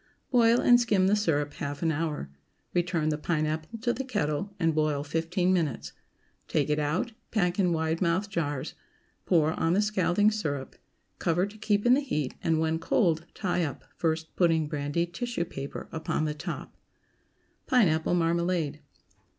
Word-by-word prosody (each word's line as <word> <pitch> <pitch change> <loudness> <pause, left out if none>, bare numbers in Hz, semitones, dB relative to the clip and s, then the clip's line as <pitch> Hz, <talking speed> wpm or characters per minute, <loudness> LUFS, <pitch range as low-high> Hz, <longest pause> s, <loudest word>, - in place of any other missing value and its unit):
Boil 235 -1 +5
and 245 0 +6
skim 205 -5 +2
the 200 +2 +4
syrup 150 -8 0
half 145 +1 -5
an 165 - +2
hour. 150 - -3 0.4
Return 175 -3 +1
the 150 0 -1
pineapple 155 +4 -2
to 240 0 +1
the 270 - -3
kettle 155 - -2
and 165 -2 +2
boil 150 -2 +1
fifteen 165 +4 0
minutes. 160 -8 -1 0.5
Take 150 -1 0
it 150 - +1
out, 150 +10 -1 0.2
pack 180 -4 0
in 180 -3 +3
wide 160 +1 0
mouthed 185 +3 +1
jars, 145 -5 -2 0.5
pour 160 -3 +3
on 165 +1 +2
the 195 - +3
scalding 205 0 +2
syrup; 145 -11 -3 0.4
cover 175 +2 +1
to 205 +1 -10
keep 210 0 0
in 245 - +6
the 265 - +5
heat, 150 - -2
and, 165 -1 +2
when 160 0 0
cold, 165 -2 +1
tie 180 -3 0
up, 145 -4 -4
first 160 -1 -2
putting 165 -3 +3
brandied 150 +4 -2
tissue 235 -3 -2
paper 140 -3 -7
upon 160 -1 -1
the 150 - -1
top. 150 - -6 0.9
PINEAPPLE 175 -9 +3
MARMALADE. 170 -3 0
165 Hz, 160 wpm, -28 LUFS, 155-190 Hz, 0.9 s, and